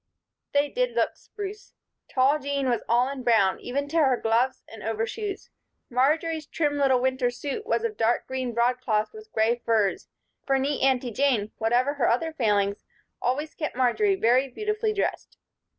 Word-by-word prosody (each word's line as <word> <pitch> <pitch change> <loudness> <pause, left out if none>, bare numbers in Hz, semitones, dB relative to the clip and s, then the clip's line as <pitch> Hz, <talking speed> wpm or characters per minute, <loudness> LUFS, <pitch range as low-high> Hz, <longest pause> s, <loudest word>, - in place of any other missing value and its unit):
They 285 0 +3
did - - -1
look - - +1
"spruce." 415 0 -9 0.3
Tall 275 +3 +3
Jean 280 -1 -2
was 240 -2 +1
all 240 +2 +4
in 275 -1 -5
brown, 220 -6 +3
even 280 +3 -3
to 330 - -1
her 270 -6 +4
gloves 235 +4 +1
and 220 -1 -11
overshoes. 225 - -4 0.4
Marjory's 305 +5 +1
trim 295 -2 -1
little 265 -2 +4
winter 260 -1 +1
suit 280 - -5
was - - +1
of 450 -2 -2
dark 230 +2 +1
green 260 -2 -3
broadcloth 235 -2 0
with 435 0 -12
gray 225 +2 +2
furs, 215 -4 +1 0.4
for 270 -1 +2
neat 275 +2 -1
Aunty 260 -2 +2
Jane, 235 -4 +1
whatever 245 +5 +2
her 280 -5 +1
other 320 +7 0
failings, 205 -7 +1 0.4
always 290 +5 -1
kept 305 -6 -4
Marjory 385 - +2
very 255 -4 +3
beautifully 425 - -2
dressed. 415 - -3
260 Hz, 165 wpm, -26 LUFS, 235-305 Hz, 0.4 s, all